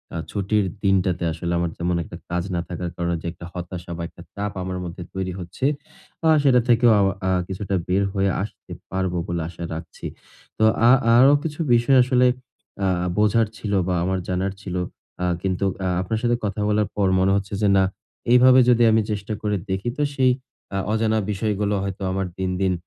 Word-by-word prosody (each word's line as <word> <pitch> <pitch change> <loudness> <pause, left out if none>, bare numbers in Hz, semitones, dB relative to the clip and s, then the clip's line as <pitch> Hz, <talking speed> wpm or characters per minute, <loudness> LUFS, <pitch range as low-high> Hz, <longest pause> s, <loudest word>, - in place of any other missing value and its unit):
আ - - -2
ছুটির 100 0 0 0.2
দিনটাতে 95 -2 +2
আসলে 85 +2 -4
আমার 85 -1 -1
যেমন 85 +1 0
একটা - - -10
কাজ 85 0 -1
না 85 - 0
থাকার 90 0 -4
কারণে 85 0 -1
যে - - -5
একটা 85 0 -11
হতাশা 90 -1 -7
বা - - -5
একটা - - -15
চাপ 100 0 -3
আমার 95 0 -4
মধ্যে 85 +1 -7
তৈরি 95 -1 -3
হচ্ছে। 90 +8 -5 0.6
আ - - +6
সেটা 130 -3 +5
থেকেও 120 0 +5
আমা 95 -1 +3 0.2
আ - - +2 0.2
কিছুটা 95 +1 -3
বের 95 +2 +2
হয়ে 95 -1 +1
আসতে 105 - -10 0.2
পারবো 95 -1 -1
বলে 85 -1 -2
আশা 85 0 -8
রাখছি। 80 +1 -8 0.5
তো - - +1 0.3
আ - - +8 0.3
আরো 135 +3 +7
কিছু 155 -1 -5
বিষয় 120 +3 +4
আসলে 125 0 +3 0.6
আ - - +3 0.3
বোঝার 105 +1 +3
ছিল 105 - -4 0.2
বা 90 - +1
আমার 95 +1 0
জানার 95 +1 -1
ছিল। 90 -2 -5 0.5
আ - - +2 0.2
কিন্তু 95 0 -1 0.2
আ - - +1
আপনার 110 +4 -2
সাথে 120 0 +3
কথা 100 +1 -2
বলার 105 -1 +2
পর 100 -2 +2
মনে 95 +1 +3
হচ্ছে 100 0 -3
যে, 105 - +3
না, 95 - +5 0.5
এইভাবে 130 +1 +7
যদি 120 -1 +5
আমি 110 0 +4
চেষ্টা 105 +1 -3
করে 105 -1 0
দেখি 95 +5 -1
তো - - -1
সেই 130 -2 +4 0.4
আ - - 0
অজানা 110 0 +1
বিষয়গুলো 105 0 -1
হয়তো 100 0 -5
আমার 95 0 -1
দিন, 95 -1 -1
দিন 95 -1 +2
95 Hz, 195 wpm, -23 LUFS, 90-110 Hz, 0.6 s, আ